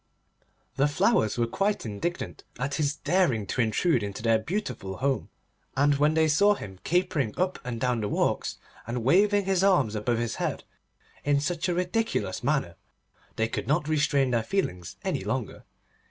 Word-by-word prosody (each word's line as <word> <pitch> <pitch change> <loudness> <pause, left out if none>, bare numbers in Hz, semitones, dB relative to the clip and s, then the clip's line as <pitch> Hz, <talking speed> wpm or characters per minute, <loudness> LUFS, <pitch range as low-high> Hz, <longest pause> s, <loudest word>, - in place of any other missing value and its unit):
The 140 - +4
Flowers 130 -6 +2
were 120 - +2
quite 200 - -1
indignant 115 +12 -4
at 135 +3 -2
his 145 -1 0
daring 155 - +1
to 125 - -1
intrude 120 - +2
into 100 +1 -5
their 115 -1 +4
beautiful 110 - -4
home, 135 +1 -1 0.5
and 145 +1 +4
when 150 +2 +3
they 160 0 +4
saw 200 +7 +4
him 95 - -9
capering 155 -9 0
up 185 0 0
and 120 -2 -4
down 125 -1 0
the 105 - -2
walks, - - 0 0.3
and 120 0 -3
waving 200 - +4
his 190 -1 +2
arms 175 - +3
above 115 +2 0
his 115 -1 -2
head - - -2 0.6
in 145 -1 +2
such 170 +4 -1
a 175 - 0
ridiculous 185 +6 -1
manner, 135 - 0 0.6
they 110 - +1
could 115 - -4
not 150 +2 +1
restrain 145 -4 +2
their 115 -2 +2
feelings 110 - -2
any - - -1
longer. - - -4
140 Hz, 170 wpm, -27 LUFS, 115-175 Hz, 0.6 s, The